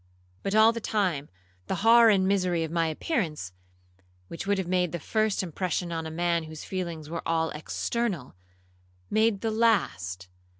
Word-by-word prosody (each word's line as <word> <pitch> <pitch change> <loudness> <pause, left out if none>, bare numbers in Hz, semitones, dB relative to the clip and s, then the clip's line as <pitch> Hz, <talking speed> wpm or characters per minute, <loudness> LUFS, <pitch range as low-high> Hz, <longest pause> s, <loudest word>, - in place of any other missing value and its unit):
'But, 195 +1 -2
all 220 +1 +6
the 230 - -5
time, 185 -10 -1 0.4
the - - -1
horror 230 0 +8
and 190 -3 +3
misery 180 -4 +1
of 160 - -4
my 165 -1 +1
appearance, 155 - -2 0.8
which 170 - -6
would 200 0 +2
have 190 - -1
made 180 -2 +1
the 175 - -2
first 215 +5 0
impression 180 0 -2
on 165 -1 -3
a - - -5
man 170 0 0
whose 155 -1 -9
feelings 170 -5 -4
were 170 +2 -4
at - - -7
all 160 -1 +1
external, 175 - -3 0.8
made 220 -2 +2
the 225 - -1
last. 90 - +1
180 Hz, 170 wpm, -27 LUFS, 160-215 Hz, 0.8 s, horror